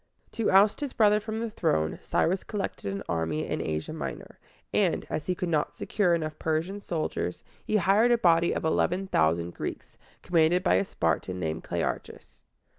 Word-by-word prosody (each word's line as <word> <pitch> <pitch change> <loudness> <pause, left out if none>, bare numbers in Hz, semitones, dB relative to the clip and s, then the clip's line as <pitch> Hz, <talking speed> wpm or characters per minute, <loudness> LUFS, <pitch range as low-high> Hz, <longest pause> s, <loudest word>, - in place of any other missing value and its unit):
To 225 - 0
oust 200 +2 +5
his 285 -3 -4
brother 210 -1 +4
from 220 +1 -4
the 230 - -2
throne, 80 - 0
Cyrus 185 +3 0
collected 195 - -4
an 100 - -4
army 80 -2 -1
in - - -2
Asia 80 0 -3
Minor; - - -7 0.3
and, - - +1
as 155 - -3
he 180 - 0
could 180 - -3
not 155 -3 0
secure 180 -5 +1
enough 155 -2 -4
Persian 165 +6 -1
soldiers, 155 - -3 0.2
he 215 - -1
hired 210 +4 +4
a 240 - +5
body 170 -4 +4
of - - -2
eleven 180 +4 +1
thousand 85 - +1
Greeks, - - -7 0.2
commanded 175 +1 +3
by - - +3
a - - +1
Spartan 90 - -1
named 80 -1 -3
Cle - - -2
ar´chus. - - -5
170 Hz, 180 wpm, -28 LUFS, -, 0.3 s, oust